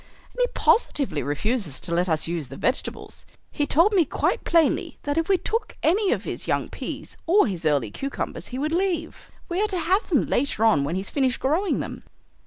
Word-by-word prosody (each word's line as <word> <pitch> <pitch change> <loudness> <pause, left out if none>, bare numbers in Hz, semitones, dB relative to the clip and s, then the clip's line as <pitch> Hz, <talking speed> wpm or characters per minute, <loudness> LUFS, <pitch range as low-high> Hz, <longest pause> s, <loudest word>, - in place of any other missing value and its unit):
And - - -10
he - - +4
positively 275 - +2
refuses 155 - -2
to 170 - -4
let 175 +2 +1
us 160 -1 +2
use 165 -4 -3
the - - -9
vegetables. 255 - -3 0.2
He 290 - -1
told 345 +8 +4
me 370 -4 +5
quite - - -1
plainly 330 -3 +2
that 290 0 -1
if 330 +2 0
we 385 - +5
took 440 +4 -3
any 385 +4 +3
of - - 0
his - - -4
young - - 0
peas - - -7
or 395 +5 +5
his 175 -7 -2
early 140 -8 +1
cucumbers 275 - -4
he 255 - -6
would 305 +4 -1
leave. 345 -3 -2 0.2
We 355 +3 -1
are - - +2
to 385 -3 -2
have 375 +6 +1
them 305 -7 +3
later 245 -4 +1
on 215 -11 +4
when 150 +5 -2
he's 190 +1 -3
finished 260 -3 +1
growing 325 +9 +1
them." - - -6
285 Hz, 205 wpm, -24 LUFS, -, 0.2 s, me